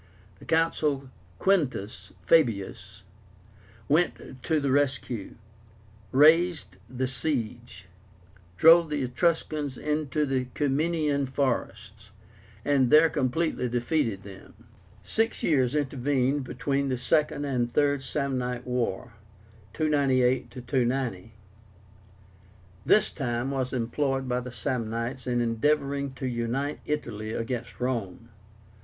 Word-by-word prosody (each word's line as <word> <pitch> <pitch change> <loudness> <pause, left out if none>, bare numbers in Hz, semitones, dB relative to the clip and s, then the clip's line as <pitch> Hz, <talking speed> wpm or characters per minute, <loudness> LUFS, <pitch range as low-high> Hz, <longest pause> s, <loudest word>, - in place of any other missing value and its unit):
The - - -14
Consul 150 -4 0 0.3
Quintus 145 - 0
Fabius 100 - +1 0.8
went 150 -4 0
to 155 +4 +1
the 140 -2 0
rescue, 130 -6 -1 0.8
raised 155 - +4
the 130 +1 -2
siege, 120 - -3 0.7
drove 165 0 +7
the 150 -2 -1
Etruscans 145 0 -1
into 150 -1 -1
the 130 -2 -1
Ciminian 145 0 +1
forests, 115 -6 -3 0.6
and 135 -3 +3
there 155 +2 +6
completely 130 -1 0
defeated 120 -4 -1
them. 100 +3 -14 0.4
Six 225 - -1
years 130 -4 +2
intervened 135 -1 0
between 140 +2 -1
the 130 - -1
Second 145 +2 +1
and 125 -4 0
the 120 - -18
THIRD 145 0 +2
SAMNITE 130 -2 -2
WAR 125 -2 -2 0.6
(298 130 -5 +2
290). 125 -5 -2 1.5
This 215 - +4
time 125 -1 -2
was 130 -2 -2
employed 135 +2 -1
by 125 0 0
the 125 0 -7
Samnites 120 0 -3
in 120 -1 +1
endeavoring 140 +3 0
to 130 0 -6
unite 125 +4 -2
Italy 110 -8 -3
against 115 +1 -4
Rome. 115 -3 -3
130 Hz, 105 wpm, -27 LUFS, 120-145 Hz, 1.5 s, drove